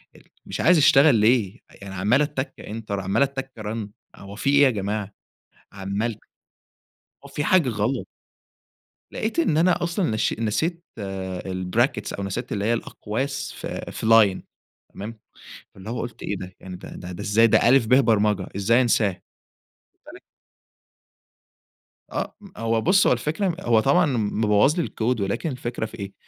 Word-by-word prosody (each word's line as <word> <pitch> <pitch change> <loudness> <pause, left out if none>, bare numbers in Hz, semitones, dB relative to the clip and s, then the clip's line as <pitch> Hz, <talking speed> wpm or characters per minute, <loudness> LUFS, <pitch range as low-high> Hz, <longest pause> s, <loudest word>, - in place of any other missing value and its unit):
أ - - -15 0.3
مش - - -4
عايز 175 +1 +5
أشتغل 145 -2 +6
ليه؟ 110 0 +2 0.2
يعني 100 -1 -8
عَمّال 105 +9 +2
أتّك 145 -2 -2
enter 110 -1 -8
عَمّال 95 +7 0
أتّك 135 -1 -4
run 105 0 -4 0.3
هو 100 +1 -11
فيه 140 +5 0
إيه 145 - +7
يا 135 - +6
جماعة؟ 105 -1 -3 0.6
عَمّال 100 +3 -3 1.1
هو - - -11
في 145 +1 -3
حاجة 170 -8 +3
غلط. 115 +4 -1 1.1
لقيت 225 +9 -2
إن 155 - +2
أنا 175 +1 +3
أصلًا 170 - 0
نشي 110 0 0
نسيت 160 - -1
آآ 95 -2 -5
الbrackets 95 +5 -1
أو 100 - -4
نسيت 100 -1 -4
اللي 100 -1 -2
هي 115 - +2
الأقواس 135 +5 -4
في - - -6
في - - -6
line، 110 -4 +5 0.5
تمام، 110 +2 -7 0.6
فاللي 95 +3 -9
هو 120 - -3
قُلت 120 -1 -7
إيه 100 - -3
ده! 90 0 -9
يعني 95 -1 -8
ده - - -11
ده 90 0 -8
ده 85 - -7
إزاي 110 +3 +4
ده 115 - +4
ألِف، 130 -3 +5
باء 130 +4 +5
برمجة، 105 -4 +1
إزاي 115 +5 +3
أنساه؟! 105 -5 +1 0.7
واخِد - - -52
بالك. - - -12 1.9
آه، - - -4 0.2
هو 115 0 0
بُص، 190 +3 +4
هو - - +5
الفكرة 160 - -1
هو 115 -2 +3
طبعًا 150 +9 +3
مبوّظ 105 +5 +2
لي 175 - +1
الكود 115 -1 -1
ولكن 100 +11 -2
الفكرة 120 -3 -4
في 110 0 -11
إيه، 100 0 -6
115 Hz, 160 wpm, -23 LUFS, 100-135 Hz, 1.9 s, إيه